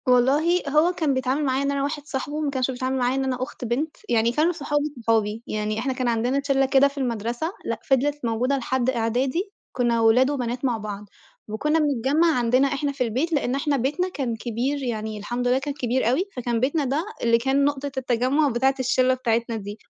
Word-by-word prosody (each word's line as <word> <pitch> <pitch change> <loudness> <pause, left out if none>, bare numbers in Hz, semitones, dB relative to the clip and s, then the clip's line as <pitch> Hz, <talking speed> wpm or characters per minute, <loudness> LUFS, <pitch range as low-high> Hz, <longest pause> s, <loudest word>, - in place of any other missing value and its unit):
والله 285 +8 +3
هو 305 +5 +4
كان 315 -5 0
بيتعامل 260 +3 0
معايا 265 +1 +1
إن 280 - 0
أنا 280 -1 -1
واحد 290 +1 -3
صاحبه، 290 +1 -4
ما 295 - 0
كانش 260 -1 0
بيتعامل 255 +1 -2
معايا 250 0 +1
إن 270 - 0
أنا 255 -1 -1
أخت 255 -1 -7
بنت، 275 +7 -2
يعني 230 -1 +3
كانوا 310 +7 +2
صحابه 295 -3 -1 0.2
صحابي، 220 0 +1
يعني 215 0 -2
إحنا 260 +3 -1
كان 255 -1 -2
عندنا 240 +4 +1
ت 280 - -7
شلّة 270 -1 +3
كده 270 +1 +5
في 280 +1 -10
المدرسة 240 - -2
لأ - - -2
فضلت 285 +1 +1
موجودة 245 +4 +1
لحد 260 0 0
إعدادي 260 - -1 0.2
كنّا 235 -2 +1
ولاد 235 +4 +5
وبنات 250 -2 -2
مع 245 -3 +1
بعض، 210 -1 -6 0.4
وكنّا 300 +9 0
بنجمع 290 +2 +2
عندنا 250 +3 +3
إحنا 280 +1 -1
في 270 -2 -1
البيت 260 +9 -1
لإن 270 -3 0
احنا 280 0 0
بيتنا 300 +9 0
كان 260 -9 -3
كبير، 245 +5 -2
يعني 220 -3 -3
الحمد 240 +4 -2
لله 250 +1 +3
كان 285 +1 -4
كبير 255 -3 0
أوي 290 +10 +1
فكان 240 -2 -1
بيتنا 285 +5 +1
ده 285 +6 -1 0.2
اللي 230 0 +4
كان 265 +4 +1
نقطة 285 -1 -1
التجمع 260 +4 +1
بتاعة 265 +2 +2
الشلّة 255 0 +2
بتاعتنا 235 -2 -1
دي. 205 0 -6
260 Hz, 205 wpm, -24 LUFS, 235-280 Hz, 0.4 s, كده